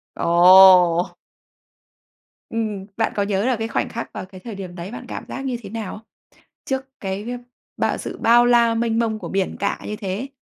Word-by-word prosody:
Ồ! 180 Hz, 0 st, +6 dB, 1.4 s
Ừm. 215 Hz, -4 st, -3 dB
Bạn 225 Hz, -, +1 dB
có 200 Hz, -, +1 dB
nhớ 200 Hz, +1 st, -1 dB
là 255 Hz, -2 st, +2 dB
cái 225 Hz, 0 st, -3 dB
khoảnh -, -, -2 dB
khắc 230 Hz, -, -6 dB
vào -, -, -6 dB
cái 185 Hz, 0 st, -14 dB
thời 230 Hz, -4 st, -7 dB
điểm 185 Hz, -2 st, -8 dB
đấy 180 Hz, +4 st, -7 dB
bạn 245 Hz, +1 st, -8 dB
cảm -, -, -7 dB
giác 270 Hz, +1 st, -6 dB
như 250 Hz, -2 st, -2 dB
thế 200 Hz, -, -9 dB
nào 220 Hz, -3 st, -5 dB
không? 220 Hz, -, -16 dB, 0.6 s
Trước 265 Hz, -2 st, -3 dB
cái, 200 Hz, +4 st, -4 dB
a, 245 Hz, -, -4 dB, 0.4 s
bao -, -, 0 dB
sự -, -, -7 dB
bao 240 Hz, +1 st, +5 dB
la, 235 Hz, -1 st, +4 dB
mênh 230 Hz, 0 st, 0 dB
mông 220 Hz, -2 st, 0 dB
của -, -, -7 dB
biển 190 Hz, -1 st, -2 dB
cả 200 Hz, -, -1 dB
như 210 Hz, -, -4 dB
thế? 205 Hz, +6 st, -4 dB
215 Hz, 200 wpm, -21 LUFS, 190-235 Hz, 1.4 s, Ồ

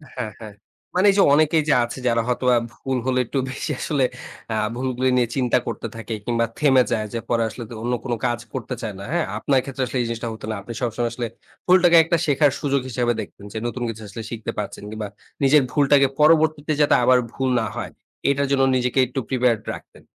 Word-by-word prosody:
হ্যাঁ, 115 Hz, -4 st, -4 dB
হ্যাঁ। 110 Hz, -2 st, -9 dB, 0.4 s
মানে 185 Hz, -, +3 dB
এইযে 195 Hz, 0 st, +4 dB
অনেকেই 155 Hz, +1 st, +4 dB
যে -, -, +6 dB
আছে 120 Hz, +2 st, -5 dB
যারা 115 Hz, -1 st, +3 dB
হয়তোবা 125 Hz, 0 st, +2 dB, 0.2 s
ভুল 135 Hz, -1 st, -3 dB
হলে 130 Hz, -1 st, +1 dB
একটু 130 Hz, -, -4 dB
বেশি 130 Hz, -, -4 dB
আসলে 145 Hz, -4 st, 0 dB, 0.5 s
আ -, -, -1 dB, 0.2 s
ভুলগুলি 130 Hz, 0 st, 0 dB
নিয়ে 120 Hz, -2 st, +3 dB
চিন্তা 125 Hz, -3 st, +2 dB
করতে 115 Hz, 0 st, -4 dB
থাকে 115 Hz, 0 st, -6 dB
কিংবা 115 Hz, -1 st, +1 dB
থেমে 135 Hz, -4 st, +5 dB
যায় 110 Hz, -2 st, 0 dB
যে 115 Hz, -, -1 dB
পরে 115 Hz, -1 st, +2 dB
আসলে 120 Hz, +2 st, -8 dB, 0.2 s
অন্য 120 Hz, +1 st, 0 dB
কোনো 120 Hz, -3 st, -1 dB
কাজ 120 Hz, -1 st, 0 dB
করতে 130 Hz, -4 st, -4 dB
চায় 110 Hz, -3 st, -4 dB
না। -, -, -7 dB
হ্যাঁ? 175 Hz, -2 st, +1 dB
আপনার 135 Hz, -3 st, +2 dB
ক্ষেত্রে 135 Hz, -1 st, -3 dB
আসলে 130 Hz, -, -3 dB
এই -, -, -1 dB
জিনিসটা 115 Hz, 0 st, -4 dB
হতো 110 Hz, -, -9 dB
না। -, -, -2 dB
আপনি 115 Hz, +4 st, -8 dB
সবসময় 120 Hz, 0 st, -1 dB
আসলে 120 Hz, -1 st, -3 dB, 0.4 s
ভুলটাকে 180 Hz, -2 st, +6 dB
একটা 165 Hz, +1 st, +1 dB
শেখার 145 Hz, -1 st, +3 dB
সুযোগ 140 Hz, -2 st, +1 dB
হিসাবে 120 Hz, -1 st, 0 dB
দেখতেন 100 Hz, 0 st, -11 dB
যে -, -, -4 dB
নতুন 120 Hz, +1 st, -4 dB
কিছু 110 Hz, -1 st, -7 dB
আসলে 115 Hz, +3 st, -7 dB
শিখতে 115 Hz, -2 st, -4 dB
পারছেন 105 Hz, -, -5 dB
কিংবা 110 Hz, 0 st, -5 dB, 0.4 s
নিজের 145 Hz, +2 st, +6 dB
ভুলটাকে 140 Hz, -1 st, +4 dB
পরবর্তীতে 155 Hz, 0 st, +4 dB
যাতে 145 Hz, -, +5 dB
আবার 125 Hz, +1 st, +5 dB
ভুল 130 Hz, -1 st, -1 dB
না 110 Hz, -, -1 dB
হয় -, -, -5 dB, 0.4 s
এটার 140 Hz, 0 st, +1 dB
জন্য 135 Hz, -1 st, +3 dB
নিজেকে 125 Hz, +1 st, +1 dB
একটু 130 Hz, +2 st, -4 dB
প্রিপেয়ারড 125 Hz, -4 st, +2 dB
রাখতেন। -, -, -12 dB
125 Hz, 210 wpm, -22 LUFS, 115-140 Hz, 0.5 s, যে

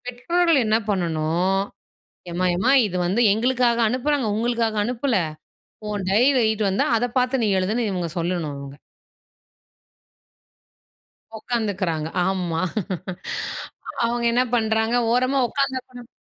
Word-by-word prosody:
இப்போ 250 Hz, -, -6 dB
பெற்றோர்கள் 340 Hz, +1 st, +3 dB
என்ன 215 Hz, 0 st, +3 dB
பண்ணணும்? 175 Hz, 0 st, 0 dB, 0.7 s
எம்மா, 180 Hz, +2 st, -1 dB
எம்மா 190 Hz, +9 st, +2 dB
இது 180 Hz, -3 st, -3 dB
வந்து 195 Hz, +7 st, +1 dB
எங்களுக்காக 240 Hz, +2 st, +2 dB
அனுப்புறாங்க. 260 Hz, +2 st, 0 dB
உங்களுக்காக 230 Hz, -1 st, 0 dB
அனுப்பல. 245 Hz, +2 st, -1 dB, 0.7 s
உன் 205 Hz, -2 st, -3 dB
டைரில 250 Hz, +7 st, +4 dB
எழுதிட்டு 220 Hz, -2 st, +1 dB
வந்தா, 195 Hz, -, +1 dB
அத 235 Hz, -, 0 dB
பாத்து 255 Hz, 0 st, +1 dB
நீ -, -, +2 dB
எழுதுன்னு 215 Hz, +5 st, 0 dB
இவுங்க 180 Hz, -3 st, -2 dB
சொல்லணும் 170 Hz, -4 st, -2 dB
இவுங்க 140 Hz, 0 st, -9 dB, 2.6 s
ஒக்காந்துக்குறாங்க. 190 Hz, -9 st, -2 dB, 0.2 s
ஆமா. 180 Hz, -4 st, -1 dB, 1.4 s
அவுங்க 235 Hz, 0 st, 0 dB
என்ன 245 Hz, +2 st, +3 dB
பண்றாங்க? 220 Hz, 0 st, +1 dB, 0.2 s
ஓரமா 255 Hz, +3 st, +2 dB
உக்காந்தப்பறம் 260 Hz, -3 st, -3 dB
220 Hz, 110 wpm, -23 LUFS, 185-245 Hz, 2.6 s, டைரில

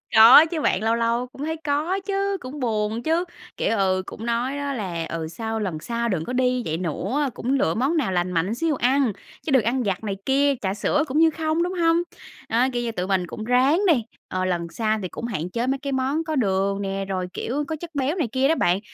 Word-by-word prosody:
Có 235 Hz, +8 st, +10 dB
chứ 320 Hz, -1 st, -3 dB
bạn, 200 Hz, -4 st, +1 dB
lâu 225 Hz, +1 st, +2 dB
lâu 235 Hz, +2 st, 0 dB
cũng 275 Hz, +4 st, -7 dB
thấy 320 Hz, 0 st, -2 dB
có 305 Hz, +6 st, 0 dB
chứ, 395 Hz, 0 st, 0 dB
cũng 265 Hz, +3 st, -8 dB
buồn 220 Hz, -1 st, -1 dB
chứ, 330 Hz, +3 st, +1 dB, 0.3 s
kiểu, 225 Hz, -, 0 dB
ừ, 185 Hz, -1 st, +1 dB
cũng 225 Hz, -, -8 dB
nói 240 Hz, +4 st, -1 dB
nó 285 Hz, -1 st, -3 dB
là, 175 Hz, -8 st, -3 dB
ừ, 165 Hz, -1 st, -3 dB
sau 225 Hz, +5 st, -4 dB
lần 180 Hz, -7 st, -3 dB
sau 235 Hz, +4 st, -2 dB
đừng 165 Hz, -5 st, -1 dB
có 250 Hz, -, -4 dB
đi 250 Hz, -1 st, +1 dB
vậy 160 Hz, +1 st, -1 dB
nữa, 255 Hz, -, -1 dB
cũng 255 Hz, +4 st, -2 dB
lựa 170 Hz, -12 st, +2 dB
món 275 Hz, +8 st, +1 dB
nào 240 Hz, -11 st, 0 dB
lành 180 Hz, 0 st, 0 dB
mạnh 180 Hz, +6 st, 0 dB
xíu 325 Hz, +2 st, 0 dB
ăn, 260 Hz, -1 st, +2 dB, 0.3 s
chứ 305 Hz, -, -2 dB
đừng 260 Hz, -5 st, +4 dB
ăn 245 Hz, +2 st, 0 dB
vặt 195 Hz, +1 st, -2 dB
này 200 Hz, -2 st, -3 dB
kia, 280 Hz, +1 st, +3 dB
trà 190 Hz, -1 st, -1 dB
sữa 290 Hz, +9 st, +1 dB
cũng 270 Hz, +3 st, -2 dB
như 325 Hz, 0 st, +6 dB
không, 320 Hz, +1 st, 0 dB
đúng 360 Hz, +1 st, -2 dB
hông? 335 Hz, -2 st, +3 dB, 0.5 s
Đó, 240 Hz, +3 st, +3 dB
kiểu 240 Hz, 0 st, -1 dB
như, 230 Hz, -, -2 dB
tụi 185 Hz, -3 st, -3 dB
mình 185 Hz, -3 st, 0 dB
cũng 215 Hz, -, -7 dB
ráng 260 Hz, -, +3 dB
đi, 280 Hz, -9 st, +4 dB, 0.2 s
ờ, 185 Hz, 0 st, -2 dB
lần 170 Hz, -2 st, -1 dB
sau 215 Hz, +3 st, -1 dB
thì 185 Hz, -, -3 dB
cũng -, -, -6 dB
hạn 180 Hz, -7 st, -3 dB
chế 235 Hz, +5 st, -2 dB
mấy 270 Hz, +1 st, +1 dB
cái 280 Hz, -1 st, -4 dB
món 270 Hz, +5 st, 0 dB
có 315 Hz, -1 st, -3 dB
đường 195 Hz, -3 st, +1 dB
nè, 195 Hz, 0 st, -3 dB
rồi, 185 Hz, -1 st, -2 dB
kiểu, 285 Hz, +5 st, -2 dB
có 320 Hz, -, -2 dB
chất 330 Hz, 0 st, -10 dB
béo 280 Hz, +5 st, 0 dB
này 315 Hz, -10 st, 0 dB
kia 265 Hz, +1 st, +2 dB
đó 325 Hz, -, +3 dB
bạn, 180 Hz, -, +2 dB
240 Hz, 245 wpm, -23 LUFS, 195-285 Hz, 0.5 s, Có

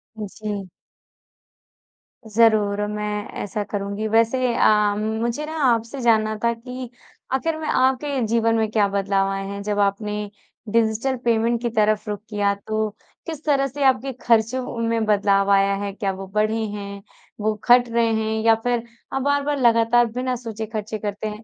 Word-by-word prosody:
जी। 210 Hz, -2 st, -6 dB, 1.6 s
ज़रूर 215 Hz, -2 st, +3 dB
और 210 Hz, -, -1 dB
मैं 210 Hz, 0 st, -3 dB, 0.2 s
ऐसा 205 Hz, +1 st, -3 dB
करूँगी। 200 Hz, +1 st, -3 dB
वैसे 230 Hz, +3 st, +2 dB
अ, 210 Hz, -1 st, +4 dB
मुझे 225 Hz, +6 st, -2 dB
ना 310 Hz, -, -6 dB, 0.2 s
आपसे 230 Hz, +4 st, -4 dB
जानना 220 Hz, -2 st, +3 dB
था 235 Hz, 0 st, +3 dB
कि 250 Hz, +2 st, -8 dB, 0.4 s
आख़िर 315 Hz, +4 st, 0 dB
में 310 Hz, -, -4 dB
आपके 265 Hz, +1 st, +1 dB
जीवन 230 Hz, 0 st, +2 dB
में 220 Hz, -1 st, +1 dB
क्या 210 Hz, -2 st, +3 dB
बदलाव 195 Hz, 0 st, 0 dB
आए 195 Hz, 0 st, -3 dB
हैं 200 Hz, 0 st, -5 dB
जब 205 Hz, 0 st, -1 dB
आपने 205 Hz, +1 st, 0 dB, 0.6 s
डिजिटल 230 Hz, +3 st, +1 dB
पेमेंट 230 Hz, 0 st, +2 dB
की 240 Hz, -, -1 dB
तरफ़ 215 Hz, -1 st, +1 dB
रुख 205 Hz, -1 st, -3 dB
किया 205 Hz, -2 st, +1 dB
तो 215 Hz, 0 st, 0 dB, 0.4 s
किस 315 Hz, -2 st, -6 dB
तरह 275 Hz, -2 st, +2 dB
से 280 Hz, +2 st, -4 dB
आपके 265 Hz, 0 st, +2 dB
ख़र्चों 235 Hz, +2 st, +1 dB
में 230 Hz, -1 st, 0 dB
बदलाव 200 Hz, -1 st, +2 dB
आया 195 Hz, 0 st, +4 dB
है? 200 Hz, 0 st, -3 dB
क्या 195 Hz, 0 st, -2 dB
वो 190 Hz, 0 st, -7 dB
बढ़े 215 Hz, +1 st, +2 dB
हैं? 200 Hz, -1 st, -7 dB, 0.4 s
वो 215 Hz, +1 st, +1 dB, 0.2 s
घट 245 Hz, 0 st, +6 dB
रहे 230 Hz, 0 st, +2 dB
हैं 220 Hz, 0 st, -1 dB
या 225 Hz, 0 st, +6 dB
फिर 245 Hz, -1 st, 0 dB, 0.3 s
आप 270 Hz, -, 0 dB
बार-बार 285 Hz, +1 st, +1 dB
लगातार 235 Hz, 0 st, +4 dB
बिना 250 Hz, +2 st, -2 dB
सोचे 225 Hz, -2 st, -6 dB
ख़र्चे 215 Hz, 0 st, -4 dB
करते 210 Hz, 0 st, -4 dB
हैं, 215 Hz, +1 st, -7 dB
220 Hz, 165 wpm, -22 LUFS, 210-240 Hz, 1.6 s, घट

